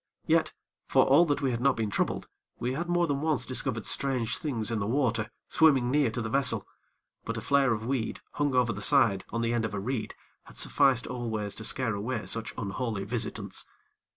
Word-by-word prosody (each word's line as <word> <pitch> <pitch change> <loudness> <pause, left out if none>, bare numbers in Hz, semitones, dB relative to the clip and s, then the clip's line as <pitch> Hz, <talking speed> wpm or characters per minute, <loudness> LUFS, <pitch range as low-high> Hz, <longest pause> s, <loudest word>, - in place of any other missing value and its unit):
Yet, - - +2 0.3
for - - +4
all 145 +6 +6
that 145 -2 -1
we 135 - +2
had 120 -1 -2
not 140 0 +3
been 110 -2 -1
troubled, - - -1 0.3
we 125 +2 -2
had 170 +5 -3
more 175 0 +3
than 145 -3 -1
once 155 -3 0
discovered 115 -4 -1
strange 130 -4 0
things 115 -8 -2
in 115 - 0
the 100 - -2
water 115 -3 0 0.2
swimming 135 -6 +4
near 145 -3 +3
to 115 +1 -3
the - - -2
vessel; 140 +3 +2 0.6
but 115 0 -4
a - - -1
flare 140 -1 +3
of 110 -1 -2
weed, 125 -3 -2
hung 145 -3 0
over 120 -2 +3
the 105 - -7
side, 110 -7 +4
on 115 - -2
the 115 0 0
end 120 -1 0
of 110 -2 -3
a - - -2
reed, 115 +3 -3 0.3
had - - -15
sufficed 135 -4 +3
always 110 -5 -3
to 110 - -7
scare 115 0 0
away 105 +3 -3
such 115 +1 -2
unholy 105 -1 -3
visitants. 115 +3 -2
120 Hz, 210 wpm, -28 LUFS, 110-135 Hz, 0.6 s, all